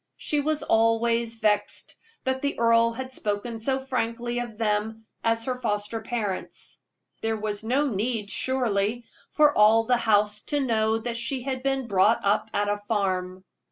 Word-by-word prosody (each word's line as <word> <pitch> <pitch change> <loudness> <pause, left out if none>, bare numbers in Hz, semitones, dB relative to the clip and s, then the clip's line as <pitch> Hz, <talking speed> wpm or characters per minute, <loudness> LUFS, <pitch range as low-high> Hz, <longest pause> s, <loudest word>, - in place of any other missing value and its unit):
She 300 - 0
was 300 +1 -1
always 230 0 +2
vexed 210 -2 0 0.3
that 260 0 -1
the 285 0 -1
earl 230 0 +4
had 260 +2 -6
spoken 220 +1 -3
so 265 +4 0
frankly 240 -2 -2
of 240 -3 -6
them 220 0 -1 0.2
as 230 0 +1
her 255 -1 -3
foster 210 +1 -2
parents. 215 -5 -4 0.4
There 225 0 -1
was 210 0 -3
no 260 +6 +1
need, 215 -2 -2
surely, 235 -3 0 0.3
for 300 -1 +4
all 215 +2 +6
the 245 +2 +2
house 210 -2 +2
to 290 - 0
know 220 -4 +1
that 235 +1 -4
she 250 +2 -2
had 260 -1 -3
been 270 -1 0
brought 205 +1 +3
up 200 +2 +2
at 205 0 0
a 205 0 0
farm. 190 -3 -2
230 Hz, 160 wpm, -26 LUFS, 210-250 Hz, 0.4 s, all